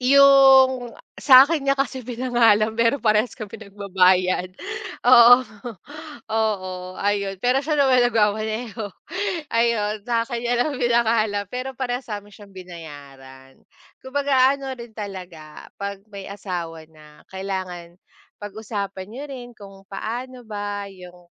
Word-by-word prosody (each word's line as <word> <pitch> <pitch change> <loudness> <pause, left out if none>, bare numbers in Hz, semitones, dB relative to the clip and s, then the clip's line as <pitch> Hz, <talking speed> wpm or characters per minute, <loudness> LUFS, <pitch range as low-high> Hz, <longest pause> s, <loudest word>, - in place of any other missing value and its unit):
'Yong 265 -2 +6 0.2
sa'kin 275 +2 +6
niya 275 - +3
kasi 270 -2 -3
pinangalan, 235 -3 +2
pero 230 +4 +2
parehas 215 +1 +2
kami 215 0 -9
nagbabayad 185 -3 +1 0.5
oo, 245 -1 +8 0.9
oo 185 -5 -2
ayon. 200 -1 0
Pero 250 +2 +2
siya 310 - 0
naman 265 -4 +4
nagmamaneho, 220 -1 -1 0.6
ayon 230 -2 +1
sa'kin 235 0 -2
niya 240 - +1
lang 290 -2 -2
pinangalan, 230 -4 +1
pero 255 +1 -5
parehas 250 0 -4
namin 205 0 -8
siyang 200 -1 -15
binayaran. 140 -7 -12 0.4
Kumbaga 270 -1 +2
ano 275 -1 -6
rin 235 -2 -11
talaga 180 -7 -9 0.2
'pag 200 0 -5
may 195 -1 -8
asawa 175 -5 -6
na 150 -1 -19
kailangan 185 -3 -6 0.4
pag-usapan 205 -2 -6
niyo 255 +6 -8
rin 255 -4 -9
kung 195 -1 -13
paano 245 +5 -6
ba 205 -1 -5
yung 180 -1 -14
215 Hz, 120 wpm, -22 LUFS, 190-250 Hz, 0.9 s, oo